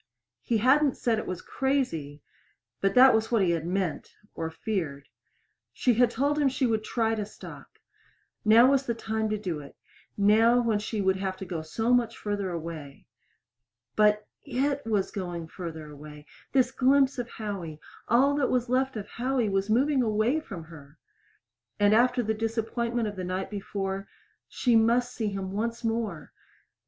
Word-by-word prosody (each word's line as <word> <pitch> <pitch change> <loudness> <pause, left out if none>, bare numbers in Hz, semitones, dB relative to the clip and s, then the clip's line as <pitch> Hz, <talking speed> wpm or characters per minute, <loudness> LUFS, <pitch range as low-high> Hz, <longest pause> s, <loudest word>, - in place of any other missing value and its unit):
He 235 - 0
hadn't 270 +5 +3
said 225 -2 +1
it - - -6
was 185 -2 -5
crazy, 165 - -2 0.6
but 195 +4 +1
that 260 +1 +8
was 220 +1 +1
what 225 -4 +3
he 170 -2 +2
meant 180 +1 -3 0.2
or 160 0 -4
feared. 160 -7 -4 0.7
She 250 - +2
had 240 +1 +4
told 285 +5 0
him 285 -2 +3
she 265 0 0
would 220 -2 0
try 225 0 0
to 215 -2 -2
stop. 205 - -12 0.7
Now 230 +5 +6
was 275 -1 +1
the 235 - 0
time 220 -1 -2
to 215 - 0
do 180 -7 -4
it 140 -1 -12 0.4
now 220 +4 +5
when 230 -3 +1
she 210 0 -3
would 190 0 +2
have 190 -1 -3
to 190 - -7
go 170 -3 -4
so 225 +9 0
much 235 -2 +1
farther 205 -2 -3
away. 160 -5 -7 0.9
But 210 0 +3 0.2
it 280 +1 -1
was 205 -3 0
going 175 -4 -5
farther 160 -4 -7
away 150 0 -11 0.3
this 260 -2 +3
glimpse 270 0 +3
of 240 -1 -4
Howie 190 -8 -6 0.3
all 265 +5 +4
that 275 -3 +1
was 250 -1 0
left 260 -1 +1
of 205 - -5
Howie 245 -1 -1
was 195 +1 0
moving 265 +5 +3
away 225 +5 +1
from 195 - -8
her! 150 -3 -14 0.8
And 205 0 +4
after 245 +2 +3
the 220 0 0
disappointment 225 +1 -2
of 205 - -5
the 185 - -5
night 185 +2 -3
before 195 -1 -4 0.4
She 245 -2 +1
must 240 +2 +3
see 220 - -2
him 195 -2 -4
once 230 +4 -3
more! 225 -9 -3
220 Hz, 170 wpm, -27 LUFS, 190-245 Hz, 0.9 s, that